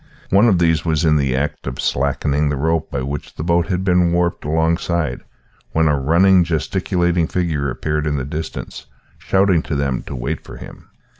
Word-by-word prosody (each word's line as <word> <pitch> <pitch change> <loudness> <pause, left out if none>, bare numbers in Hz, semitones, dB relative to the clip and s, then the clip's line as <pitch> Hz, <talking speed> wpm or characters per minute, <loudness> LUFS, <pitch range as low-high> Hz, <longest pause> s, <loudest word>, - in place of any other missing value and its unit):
One 100 +5 +5
of 95 - +3
these 80 -3 +2
was 80 -1 0
in 75 -1 +4
the 70 -3 0
act 75 +2 -3
of 65 - -5
slackening 70 +2 0
the 75 - -1
rope 80 +3 0
by 65 - -3
which 70 +2 -6
the - - -5
boat 85 0 +1
had 95 -1 -1
been 90 -2 +3
warped 85 0 0
alongside, 80 +2 0 0.5
when 80 0 +3
a 75 -2 +2
running, 90 +6 +4
gesticulating 85 0 0
figure 80 -6 -1
appeared 75 +3 -2
in 75 -1 0
the 65 - -3
distance, 80 +2 -6 0.3
shouting 95 -3 +2
to 75 - -4
them 70 -2 -1
to 70 - -5
wait 65 +6 -4
for - - -11
him. - - -12
80 Hz, 190 wpm, -19 LUFS, 75-85 Hz, 0.5 s, One